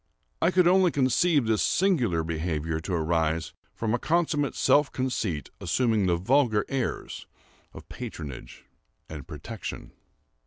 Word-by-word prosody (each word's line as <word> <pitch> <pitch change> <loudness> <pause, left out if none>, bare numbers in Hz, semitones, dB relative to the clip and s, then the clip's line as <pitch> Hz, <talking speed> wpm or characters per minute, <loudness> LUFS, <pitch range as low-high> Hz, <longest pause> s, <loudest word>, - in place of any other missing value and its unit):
I 165 - +4
could 180 -1 +3
only 185 0 +5
conceive 140 +1 +2
this 110 -1 +1
singular 125 - +2
behavior 80 -1 -2
to 85 +3 -5
arise 80 -1 0 0.2
from 110 -1 -1
a 120 - +1
consummate 155 -3 0
self 145 -1 +3
conceit 110 - -2
assuming 110 -6 +1
the 85 - +3
vulgar 110 +3 +2
airs 135 -3 -3 0.4
of - - -12
patronage 70 -6 -8 0.4
and 75 -3 -9
protection. - - -7
115 Hz, 125 wpm, -27 LUFS, -, 0.4 s, only